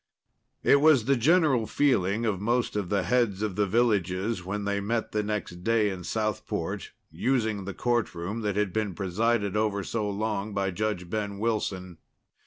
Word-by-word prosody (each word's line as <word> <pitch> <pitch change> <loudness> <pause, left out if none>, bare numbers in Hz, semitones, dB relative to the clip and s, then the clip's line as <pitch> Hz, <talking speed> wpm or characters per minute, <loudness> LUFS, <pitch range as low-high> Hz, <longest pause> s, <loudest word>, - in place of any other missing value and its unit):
It 140 - +5
was 145 -7 +5
the 140 +2 +3
general 135 -3 +3
feeling 115 -6 +1
of 100 -4 -1
most 120 +2 0
of 100 -4 -2
the 100 -2 +1
heads 105 0 +1
of 105 -4 -2
the 105 0 +1
villages 100 -2 +1
when 100 +3 -3
they 100 0 0
met 110 +3 -2
the 105 - 0
next 105 -4 -4
day 110 -2 +2
in 90 -2 -6
Southport, 110 +2 -3 0.2
using 110 +2 0
the 100 - -5
courtroom 115 -4 -1
that 105 -3 -1
had 105 -3 0
been 105 -4 -1
presided 100 +2 0
over 105 -2 0
so 105 +1 -2
long 105 0 -2
by 95 -1 0
Judge 105 -2 -2
Ben 100 0 -3
Wilson. 95 -5 -2
105 Hz, 170 wpm, -27 LUFS, 100-115 Hz, 0.2 s, It